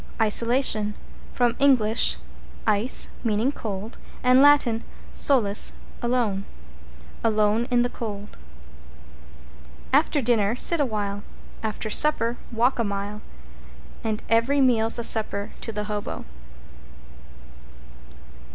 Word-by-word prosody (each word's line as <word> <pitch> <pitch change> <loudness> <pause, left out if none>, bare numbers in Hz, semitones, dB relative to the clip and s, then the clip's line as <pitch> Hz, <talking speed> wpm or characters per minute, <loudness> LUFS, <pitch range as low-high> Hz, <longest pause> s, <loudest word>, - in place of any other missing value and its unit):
=ISOLATION= 220 -1 +2 0.4
From 240 -1 0
Eng. 275 -2 +5 0.9
ice, 210 +5 +1
meaning 225 +3 0
cold, 215 -4 -7 0.2
and 255 +1 +5
Lat. 290 0 +6 0.5
solus, 215 -8 +3 0.3
alone. 235 -5 -1 0.8
Alone 215 +1 +1
in 245 -1 +2
the 245 - -1
cold. 210 -4 -8 1.6
After 295 +1 +2
dinner 225 -4 +1
sit 335 +6 +4
a 290 - +2
while, 205 -2 -4 0.4
after 215 0 -5
supper 240 -5 +2
walk 240 +3 0
a - - +2
mile 205 0 -5 0.8
And 220 -1 -3
every 230 +5 +2
meal's 230 -4 +3
a 235 - -3
supper 215 -3 +3
to 225 - -5
the 210 -1 -4
Hobo. 210 -1 -5
225 Hz, 105 wpm, -24 LUFS, 210-250 Hz, 1.6 s, Lat